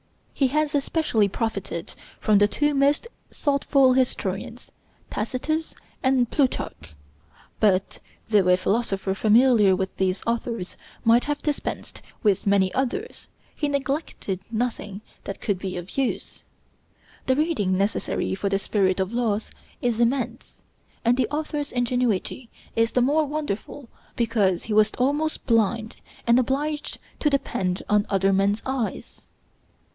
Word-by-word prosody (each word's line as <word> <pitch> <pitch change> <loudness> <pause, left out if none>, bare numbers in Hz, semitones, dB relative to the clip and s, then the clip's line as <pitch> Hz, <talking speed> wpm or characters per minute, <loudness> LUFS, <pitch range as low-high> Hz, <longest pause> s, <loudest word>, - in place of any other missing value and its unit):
He 275 - +2
has 305 +2 0
especially 280 -7 +1
profited 200 -6 -3 0.3
from 210 -2 +4
the 205 - +5
two 295 +7 +1
most 285 +9 +2 0.2
thoughtful 280 -2 +3
historians, 235 -3 -2 0.4
Tacitus 290 +9 -2 0.3
and 260 -2 +3
Plutarch; 85 - -1 0.6
but, 195 -3 +2 0.3
though 205 -4 +3
a 180 0 +5
philosopher 195 -1 0
familiar 215 -1 +5
with 190 0 -3
these 190 0 0
authors 230 -4 -2 0.3
might 235 +1 +4
have 295 0 -2
dispensed 295 -2 -3 0.2
with 200 -2 +2
many 195 -2 +3
others, 335 - -3 0.3
he 295 - -1
neglected 275 - -2
nothing 220 -3 -3 0.2
that 200 - -5
could 200 -4 -1
be 185 -1 -4
of 175 +1 -8
use. 270 -2 -2 0.8
The 260 - +3
reading 265 - +1
necessary 200 0 -1
for 195 +1 -1
the 195 - +2
'Spirit 195 -2 +1
of 190 +3 -1
Laws' 225 -3 -1 0.3
is 235 -2 +1
immense; 240 +2 -1 0.5
and 235 +1 +5
the 260 - +1
author's 295 -1 -3
ingenuity 245 -1 -1 0.3
is 230 0 +2
the 250 - +3
more 300 +4 +3
wonderful 290 -3 -4 0.3
because 210 -6 +1
he 215 - -3
was 215 0 +5
almost 290 +5 0
blind, 225 0 +1 0.3
and 235 +1 +5
obliged 290 +4 -1 0.2
to 300 - +2
depend 190 -10 -1
on 210 0 +2
other 195 0 +2
men's 200 +2 +1
eyes. 260 -4 -4
230 Hz, 130 wpm, -24 LUFS, 200-275 Hz, 0.8 s, the